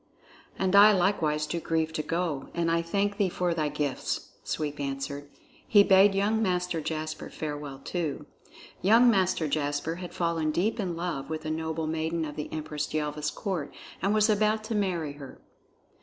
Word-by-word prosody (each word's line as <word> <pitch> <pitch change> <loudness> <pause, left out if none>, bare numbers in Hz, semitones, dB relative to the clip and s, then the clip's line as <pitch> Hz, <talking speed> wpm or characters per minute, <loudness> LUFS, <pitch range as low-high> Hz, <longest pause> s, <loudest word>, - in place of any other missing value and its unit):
"And 190 0 +1
I 205 +2 +9
likewise 165 -6 +1
do 170 +2 -3
grieve 160 -1 -1
to 155 - -1
go; 165 -4 -2
and 170 -1 +1
I 170 0 +2
thank 200 +4 -1
thee 200 -3 +2
for 175 0 0
thy 155 -3 0
gifts," 145 -2 -3
Sweep 150 -2 -3
answered. 140 +1 -4 0.4
He 205 -6 +7
bade 195 0 +6
young 210 +3 +2
Master 180 -4 0
Jasper 155 0 -4
farewell 145 -3 -5
too. 160 -5 -3 0.6
Young 230 +5 +6
Master 185 -5 +1
Jasper 145 +2 -1
had 180 -1 -7
fallen 165 -2 0
deep 200 +9 0
in 180 -5 -2
love 170 -5 -3
with 155 -1 -4
a 155 - -1
noble 160 0 -2
maiden 160 +1 -1
of 150 -1 -7
the 150 - -5
Empress 150 -1 -4
Yelva's 150 0 -1
court 180 -7 -4 0.3
and 195 - +1
was 215 0 +4
about 215 0 +2
to 220 +1 -4
marry 180 -8 -1
her. 140 -2 -11
165 Hz, 170 wpm, -28 LUFS, 150-190 Hz, 0.6 s, I